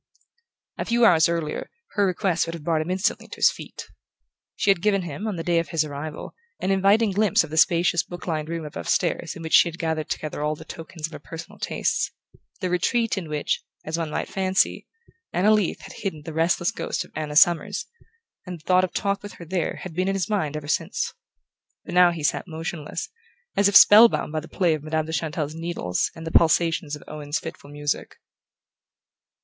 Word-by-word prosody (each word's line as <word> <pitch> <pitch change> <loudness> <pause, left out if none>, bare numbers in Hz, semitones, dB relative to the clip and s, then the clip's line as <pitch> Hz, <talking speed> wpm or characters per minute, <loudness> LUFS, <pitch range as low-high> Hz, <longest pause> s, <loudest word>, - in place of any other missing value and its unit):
A - - -1
few 235 0 +3
hours 165 -5 +5
earlier, 165 -3 -3 0.2
her 205 -1 +2
request 180 -2 0
would 165 - -4
have 165 - -9
brought 160 -1 +1
him 155 - -5
instantly 185 +2 -1
to - - -9
his - - +5
feet. - - -9 0.7
She 200 - +3
had 185 -3 0
given 200 -1 +2
him, 175 +6 -5
on 210 - -2
the 165 - -4
day 170 -1 +2
of 165 - -3
his 160 -3 +1
arrival, 150 +1 -6 0.3
an 190 - 0
inviting 200 +3 +4
glimpse 205 -2 +3
of 155 - -9
the 160 - -4
spacious 170 +1 +4
book 175 0 -9
lined 155 -2 -2
room 165 -1 -4
above 150 - -6
stairs 170 -2 0
in 170 - -8
which 160 - -5
she - - +7
had 170 0 -6
gathered 160 -2 -2
together 155 -1 -4
all 150 +1 0
the 160 - -12
tokens 165 -1 -7
of 160 - -8
her - - -7
personal 165 0 -10
tastes: - - 0 0.5
the 185 - -1
retreat 230 +6 +1
in 180 -6 -5
which, 150 -1 -1 0.2
as 155 - -2
one 165 -2 -2
might - - -2
fancy, 190 0 0 0.5
Anna 200 +4 +4
Leath 210 -4 +1
had - - -10
hidden 160 -7 -5
the 160 - -7
restless 170 +2 +1
ghost - - -3
of - - -20
Anna 150 -1 -4
Summers; 175 +4 +4 0.6
and 180 -2 -6
the - - -23
thought 185 +1 +4
of 185 - 0
a - - -39
talk 200 0 -1
with 205 - -9
her 170 - -11
there 175 0 -2
had 185 - -7
been 185 +3 0
in 195 - 0
his 190 - -1
mind 155 -9 -1
ever 150 -1 -7
since. 150 - -1 0.7
But - - -7
now 180 0 +7
he 170 -3 -4
sat 150 - 0
motionless, 160 -2 -5 0.5
as 200 - +4
if 200 - -3
spell 210 +3 +10
bound - - -3
by 155 - -1
the 155 - -10
play 175 -4 +1
of 155 - -3
Madame 155 +1 -1
de 160 - -6
Chantelle's 155 -2 -2
needles 165 - -2
and 165 -1 -9
the 165 - -4
pulsations 165 -1 +3
of 150 - -12
Owen's 150 0 -3
fitful 160 -3 -8
music. 145 0 -3
170 Hz, 215 wpm, -24 LUFS, 155-185 Hz, 0.7 s, spell